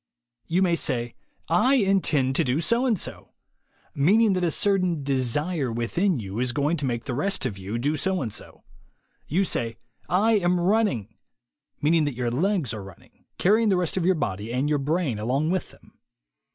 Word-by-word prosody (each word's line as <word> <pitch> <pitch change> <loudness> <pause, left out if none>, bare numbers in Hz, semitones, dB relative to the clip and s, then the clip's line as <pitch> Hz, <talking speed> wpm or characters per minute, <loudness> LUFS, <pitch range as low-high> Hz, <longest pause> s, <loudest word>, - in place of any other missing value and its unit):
You 180 0 +2
say, 120 -5 -1 0.3
"I 250 +12 +3
intend 185 - +2
to - - +4
do 130 +4 0
so 235 +10 +1
and 220 -7 +1
so," - - -7 0.3
— - - -47 0.2
meaning 200 +9 +4
that 185 -1 -1
a 175 - +2
certain 180 -3 0
desire 140 +2 0
within 135 - 0
you 100 0 -5
is 125 -1 0
going 145 +6 0
to 145 -3 -2
make 120 -2 -3
the 130 - -3
rest 150 +5 -1
of 115 -6 -2
you 100 +4 -4
do 145 +6 0
so 190 +3 0
and 110 -4 -5
so. - - -8 0.6
You 180 +7 +1
say, 115 - -2 0.3
"I 210 +5 +3
am 180 -1 +1
run 210 +6 +3
ning," 110 - -6 0.3
— - - -50
meaning 160 +1 +3
that 145 -4 -2
your 120 -1 -2
legs 170 - 0
are 105 -3 -6
running, 95 -2 -16
carry 210 +5 +3
ing 225 - +2
the 190 - +3
rest 180 -3 -1
of 185 - 0
your 185 +2 +3
body 105 - -3
and 130 +4 0
your 150 -1 +1
brain 145 - -1
along 135 +9 0
with 185 -1 -2
them. - - -20
150 Hz, 200 wpm, -25 LUFS, 125-185 Hz, 0.6 s, to